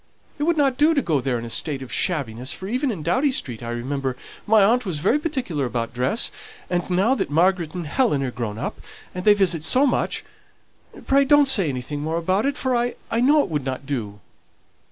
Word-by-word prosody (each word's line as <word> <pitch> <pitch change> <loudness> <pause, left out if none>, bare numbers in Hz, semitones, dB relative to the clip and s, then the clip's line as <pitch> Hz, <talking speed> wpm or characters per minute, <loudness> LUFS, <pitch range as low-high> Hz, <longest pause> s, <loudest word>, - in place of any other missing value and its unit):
It - - -1
would 340 0 +1
not 275 -3 +2
do 315 +2 +4
to 280 - +2
go 150 -5 0
there 125 -1 -1
in 115 - -6
a - - -7
state 140 0 -2
of 130 - -9
shabbiness, 130 -6 -1
for 190 - -8
even 255 +6 -1
in 190 -10 -4
Doughty 270 - +1
Street, 125 - -3
I 115 - -6
remember, 130 +2 -3 0.3
my 215 -1 +5
aunt 240 +5 +3
was 180 -8 -3
very 200 - +2
particular 255 - -3
about 115 -2 -3
dress; 125 - +1 0.4
and 175 0 -1
now 190 +8 +2
that 270 - -2
Margaret 170 +1 +1
and 175 -2 -4
Helen 150 - +1
are 130 - -2
grown 110 -3 -5
up, - - -5 0.3
and 180 0 -6
they 210 -1 +7
visit 180 -6 +1
so 255 - +3
much, 260 - -1 0.8
pray 275 +1 +4
don't 290 0 +5
say 195 - +5
anything 130 +2 -4
more 160 +2 -2
about 185 +8 0
it, 285 0 -2
for 260 -3 0
I 240 0 0 0.2
know 290 +4 +4
it - - -6
would 150 -4 -2
not 130 +1 -5
do." 110 -7 -4
175 Hz, 215 wpm, -22 LUFS, -, 0.8 s, they